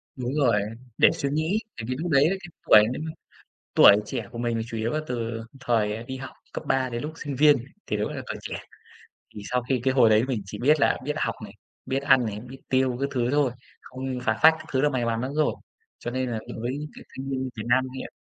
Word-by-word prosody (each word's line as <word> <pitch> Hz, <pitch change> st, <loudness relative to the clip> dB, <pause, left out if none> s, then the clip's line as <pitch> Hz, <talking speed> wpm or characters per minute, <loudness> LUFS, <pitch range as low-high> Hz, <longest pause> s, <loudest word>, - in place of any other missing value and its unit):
Đúng 125 Hz, +1 st, -3 dB
rồi, 120 Hz, -8 st, +3 dB, 0.4 s
để -, -, +6 dB
suy 140 Hz, -, -2 dB
nghĩ, 160 Hz, +8 st, 0 dB, 0.2 s
tại 110 Hz, -, -5 dB
vì 130 Hz, -, 0 dB
lúc 170 Hz, 0 st, -2 dB
đấy 140 Hz, +2 st, +5 dB
cái 195 Hz, -, -1 dB, 0.3 s
tuổi 105 Hz, -, +9 dB
nếu 130 Hz, -, -4 dB
mà 160 Hz, -, -4 dB, 0.6 s
tuổi 100 Hz, -, +9 dB
trẻ -, -, -4 dB
của 120 Hz, -, -8 dB
mình 120 Hz, -1 st, -1 dB
là 115 Hz, -, -1 dB
chủ 115 Hz, -, -5 dB
yếu 110 Hz, +1 st, -1 dB
là 155 Hz, -, 0 dB
từ 115 Hz, -2 st, -3 dB, 0.2 s
thời 110 Hz, -3 st, 0 dB
đi 130 Hz, +2 st, -6 dB
học 135 Hz, 0 st, -7 dB, 0.2 s
cấp -, -, -5 dB
ba 130 Hz, -1 st, +1 dB
đến 120 Hz, 0 st, -4 dB
lúc 150 Hz, -, -4 dB
sinh 145 Hz, -4 st, -5 dB
viên 145 Hz, +1 st, +6 dB, 0.3 s
thì 105 Hz, -, -1 dB
đúng 105 Hz, -, -1 dB
là -, -, -5 dB
còn -, -, -5 dB
trẻ. -, -, -5 dB, 0.8 s
Thì 105 Hz, -, -7 dB
sau 125 Hz, -1 st, +1 dB
khi 130 Hz, -3 st, +1 dB
cái 130 Hz, 0 st, +2 dB
hồi 120 Hz, -4 st, +6 dB
đấy 110 Hz, +3 st, +5 dB
mình 125 Hz, -6 st, -2 dB
chỉ 105 Hz, +2 st, -8 dB
biết 150 Hz, +4 st, +4 dB
là -, -, +3 dB
biết 150 Hz, -, -1 dB
học -, -, 0 dB
này, -, -, -10 dB, 0.3 s
biết 135 Hz, +1 st, -1 dB
ăn 130 Hz, -3 st, +5 dB
này, 105 Hz, -1 st, -4 dB
biết 125 Hz, +3 st, -11 dB
tiêu 130 Hz, -1 st, +2 dB
các 140 Hz, -, 0 dB
thứ 125 Hz, -1 st, 0 dB
thôi, 145 Hz, -3 st, +2 dB, 0.3 s
không 130 Hz, 0 st, -5 dB
phá 110 Hz, 0 st, +1 dB
phách 160 Hz, +1 st, +9 dB
các -, -, -10 dB
thứ 130 Hz, -, +2 dB
là 150 Hz, -, +4 dB
may 130 Hz, -4 st, -1 dB
mắn 115 Hz, 0 st, 0 dB
lắm 130 Hz, +2 st, -3 dB
rồi, 155 Hz, -1 st, +2 dB, 0.4 s
cho 120 Hz, -, -5 dB
nên 130 Hz, 0 st, -2 dB
là 115 Hz, -, -2 dB, 0.2 s
với 120 Hz, +2 st, -2 dB
những 150 Hz, 0 st, -6 dB
cái -, -, -12 dB
thanh 135 Hz, +1 st, -5 dB
niên 130 Hz, -1 st, -2 dB
Việt 110 Hz, -, -4 dB
Nam 130 Hz, +2 st, +4 dB
hiện -, -, -6 dB
130 Hz, 255 wpm, -26 LUFS, 115-140 Hz, 0.8 s, tuổi